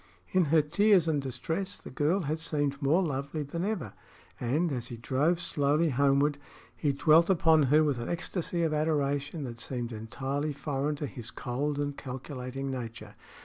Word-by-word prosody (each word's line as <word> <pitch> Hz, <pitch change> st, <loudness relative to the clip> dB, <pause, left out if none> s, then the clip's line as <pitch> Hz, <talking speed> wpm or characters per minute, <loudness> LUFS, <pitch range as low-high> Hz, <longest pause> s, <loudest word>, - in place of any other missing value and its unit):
In 185 Hz, -2 st, +4 dB
her 155 Hz, +1 st, +4 dB
tears 180 Hz, +3 st, +4 dB
and 150 Hz, -3 st, +1 dB
distress 160 Hz, +9 st, -3 dB
the -, -, -11 dB
girl 150 Hz, +9 st, +1 dB
had 155 Hz, 0 st, -2 dB
seemed 145 Hz, -3 st, -1 dB
more 155 Hz, +7 st, +3 dB
lovely 145 Hz, 0 st, -2 dB
than 165 Hz, +5 st, -4 dB
ever, 185 Hz, -, -2 dB, 0.5 s
and, 150 Hz, +8 st, +1 dB
as 120 Hz, -3 st, -3 dB
he 120 Hz, -, -7 dB
drove 145 Hz, +9 st, +1 dB
slowly 155 Hz, -1 st, +1 dB
homeward, 140 Hz, +2 st, +2 dB, 0.4 s
he 145 Hz, -, +1 dB
dwelt 160 Hz, +5 st, +5 dB
upon 160 Hz, -4 st, +5 dB
her 155 Hz, +2 st, +6 dB
with 145 Hz, -5 st, 0 dB
an 120 Hz, -, -4 dB
ecstasy 175 Hz, 0 st, -2 dB
of 160 Hz, -2 st, +1 dB
adoration 145 Hz, -1 st, 0 dB
that 120 Hz, -3 st, -6 dB
seemed 120 Hz, -1 st, -4 dB
entirely 135 Hz, +7 st, -3 dB
foreign 140 Hz, +1 st, -2 dB
to 145 Hz, -, -4 dB
his 120 Hz, -3 st, -7 dB
cold 140 Hz, +5 st, -2 dB
and 145 Hz, -1 st, -2 dB
calculating 130 Hz, 0 st, -5 dB
nature. 115 Hz, -4 st, -6 dB
145 Hz, 170 wpm, -29 LUFS, 135-160 Hz, 0.5 s, her